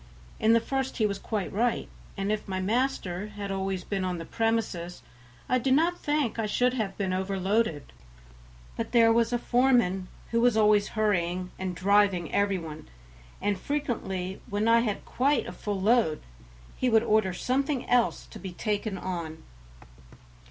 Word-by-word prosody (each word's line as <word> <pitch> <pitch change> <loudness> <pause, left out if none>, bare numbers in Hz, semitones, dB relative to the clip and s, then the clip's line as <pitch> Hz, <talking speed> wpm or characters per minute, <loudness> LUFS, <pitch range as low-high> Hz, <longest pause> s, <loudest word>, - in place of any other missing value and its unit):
In 220 +1 +4
the 230 - +6
first 265 +3 -3
he 220 - +2
was 200 -1 -1
quite 210 -4 -3
right, 235 +4 0 0.3
and 195 +1 -1
if 215 0 -2
my 190 -1 -2
master 205 -3 -1
had 205 -1 -6
always 190 -1 -2
been 195 0 -2
on 180 -1 -2
the 165 - -6
premises 220 -7 -2 0.4
I 255 - +2
do 265 - -1
not 330 +6 +3
think 290 -7 0
I 220 - 0
should 250 +4 +2
have 215 -6 -3
been 190 -2 -1
overloaded, 190 -2 -1 0.8
but - - -4
there 230 -1 +6
was 230 0 +2
a 240 - +2
foreman 240 -7 +2 0.2
who 230 0 +2
was 240 -2 +4
always 210 -1 +4
hurrying 180 -4 0
and 185 -1 -3
driving 195 -2 +2
every 200 -1 +2
one, 155 -3 -8 0.5
and 200 -2 0
frequently 195 -10 -3
when 205 +2 0
I 230 0 +6
had 220 -4 -2
quite 275 +1 +1
a - - -6
full 200 +2 -4
load 210 -6 +2 0.5
he 255 - +1
would 225 -1 +4
order 215 -4 +2
something 260 +7 -1
else 245 -1 +2
to - - -9
be 190 -2 -7
taken 205 +1 -2
on. 170 -4 -5
210 Hz, 165 wpm, -28 LUFS, 185-235 Hz, 0.8 s, the